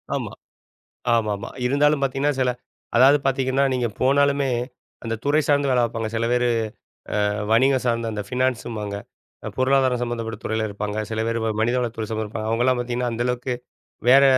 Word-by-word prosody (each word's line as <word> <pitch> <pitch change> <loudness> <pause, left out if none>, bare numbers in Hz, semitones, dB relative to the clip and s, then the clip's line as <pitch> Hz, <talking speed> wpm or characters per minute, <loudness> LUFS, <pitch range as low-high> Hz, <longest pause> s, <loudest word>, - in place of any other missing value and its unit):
ஆமா, - - -3 0.8
ஆமாமா. 105 -3 -1 0.2
இருந்தாலும் 145 +2 +3
பார்த்தீங்கன்னா 135 +2 +1
சில 125 - +3 0.5
அதாவது 135 +4 +7
பார்த்தீங்கன்னா, 135 0 +1
நீங்க 125 -2 0
போனாலுமே 140 +1 +3 0.5
அந்த 115 0 -2
துறை 150 +2 +3
சார்ந்த 145 -1 +3
வேலை 125 -1 +3
பார்ப்பாங்க. 115 -1 -1
சில 115 +1 0
பேரு, 125 0 +2 0.8
அ - - +2 0.2
வணிகம் 130 +3 +4
சார்ந்த 115 -1 0
அந்த 105 -1 -3
ஃபினான்ஸும்பாங்க 120 -5 -2 0.5
அ - - -2
பொருளாதாரம் 130 -1 +3
சம்பந்தப்பட்ட 115 -2 -4
துறையில 110 0 -1
இருப்பாங்க. 105 +1 -3
சில 110 0 -1
பேர் 115 0 0
வ 110 - +1
மனிதவளத்துறை 115 -1 0
சம்மந்தப்பட்ட 110 0 -3
அவுங்கள்லாம் 125 +2 +2
பார்த்தீங்கன்னா, 120 0 -2
அந்த 115 +1 -1
அளவுக்கு 125 0 -1 0.5
வேற 135 +2 +8
125 Hz, 150 wpm, -23 LUFS, 115-135 Hz, 0.8 s, வேற